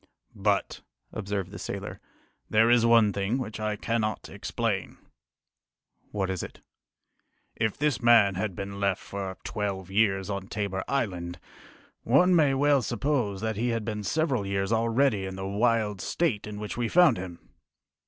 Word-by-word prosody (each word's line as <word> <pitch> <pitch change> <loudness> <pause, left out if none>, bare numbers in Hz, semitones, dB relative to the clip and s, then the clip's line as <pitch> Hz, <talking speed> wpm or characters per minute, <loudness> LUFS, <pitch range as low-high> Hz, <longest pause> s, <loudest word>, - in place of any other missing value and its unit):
"But," 100 0 0 0.3
observed 100 -3 -3
the 105 - -8
sailor, - - -5 0.5
"there 110 +2 +4
is 120 -1 +5
one 115 -3 +5
thing 100 +5 -1
which 110 -5 -5
I 110 -1 -1
cannot 110 -1 -2
explain." - - -3 1.1
"What 100 -2 -2
is 95 - -3
it?" - - -9 0.9
"If 110 -2 -1
this 145 -6 0
man 115 -4 +6
had 95 0 -3
been 100 +1 -6
left 100 -1 +1
for 95 -1 -6
twelve 95 -3 -3
years 95 -2 +2
on 100 -2 -4
Tabor 100 -2 -3
Island, 90 -10 -2 0.6
one 180 +10 +4
may 145 -5 +4
well 140 0 +3
suppose 120 -5 -1
that 110 -2 -2
he 120 +3 0
had 115 -3 -1
been 105 -1 -3
several 135 - 0
years 95 +1 -1
already 115 -2 +2
in 95 - -6
the 95 0 -5
wild 105 -1 +1
state 125 -13 -1
in 105 -1 -6
which 105 0 -5
we 120 -1 -1
found 175 -8 +5
him!" 90 -2 -8
105 Hz, 155 wpm, -27 LUFS, 100-120 Hz, 1.1 s, man